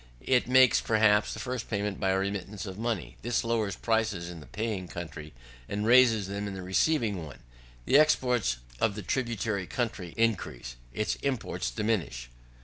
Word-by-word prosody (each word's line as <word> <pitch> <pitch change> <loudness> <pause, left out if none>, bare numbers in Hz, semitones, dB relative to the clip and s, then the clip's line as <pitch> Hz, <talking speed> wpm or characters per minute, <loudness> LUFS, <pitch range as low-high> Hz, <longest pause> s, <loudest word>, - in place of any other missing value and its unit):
It 125 -2 +3
makes, 130 -1 +6
perhaps, 110 -1 +3
the - - -6
first 125 +1 -4
payment 105 -2 -2
by 95 - +1
a 95 - +2
remittance 100 +1 -3
of 95 0 -7
money. 115 -5 -3
This 120 -1 0
lowers 110 -4 0
prices 105 -6 -1
in 85 - -9
the 75 - -13
paying 105 - -3
country, 75 -3 -7 0.4
and 105 +1 -2
raises 115 -3 +6
them 100 +1 -4
in 100 - -5
the 95 - -6
receiving 100 - +1
one: 75 -4 -10 0.5
the 140 - +6
exports 125 - +2 0.2
of 105 -3 +1
the 105 - -6
tributary 110 -4 -1
country 105 -8 -3
increase, 90 - -1 0.2
its 105 - -1
imports 130 - -2
diminish. 65 - -2
105 Hz, 165 wpm, -29 LUFS, 95-115 Hz, 0.5 s, makes